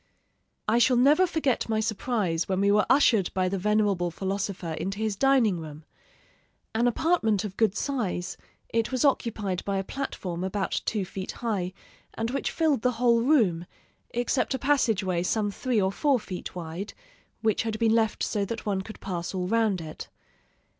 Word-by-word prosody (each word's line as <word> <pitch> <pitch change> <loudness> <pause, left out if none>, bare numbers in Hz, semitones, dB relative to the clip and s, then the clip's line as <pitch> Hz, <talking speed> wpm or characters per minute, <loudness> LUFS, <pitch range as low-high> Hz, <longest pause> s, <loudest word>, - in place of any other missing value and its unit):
"I 225 +3 +3
shall 245 +1 +4
never 295 +9 +5
forget 290 -9 0
my 220 -1 +1
surprise 210 -6 -1
when 190 -1 +1
we 200 +1 +3
were 210 +1 +3
ushered 230 -9 +4
by 185 -1 +2
the 195 +1 -1
venerable 205 -3 +1
philosopher 190 -1 -3
into 195 +5 -3
his 215 -1 -1
dining 245 -7 +3
room. 155 -1 -9 0.9
An 230 +2 +2
apartment 235 - +2
of 200 -3 -5
good 215 -2 +2
size, 220 -10 -2 0.3
it 230 +1 0
was 255 +1 +1
occupied 215 -8 0
by 200 -1 -1
a 195 - -1
platform 185 -8 -4
about 190 +1 -1
two 210 -4 -1
feet 190 0 -6
high, 205 -7 -2 0.4
and 225 +1 -2
which 275 - -1
filled 310 -7 +1
the 250 +1 +2
whole 235 0 +3
room, 215 - +2 0.4
except 245 +3 0
a - - -1
passageway 225 -10 +1
some 205 +3 0
three 245 +2 0
or 190 -1 +2
four 275 +5 +2
feet 185 -4 -7
wide, 175 +3 -6 0.5
which 220 -1 +2
had 225 -1 -2
been 225 -1 +3
left 225 -2 +1
so 205 -2 0
that 225 +3 -5
one 195 -2 0
could 215 +3 -10
pass 175 -1 -4
all 180 -1 -1
round 220 -3 +2
it. 155 -1 -8
215 Hz, 175 wpm, -27 LUFS, 190-240 Hz, 0.9 s, never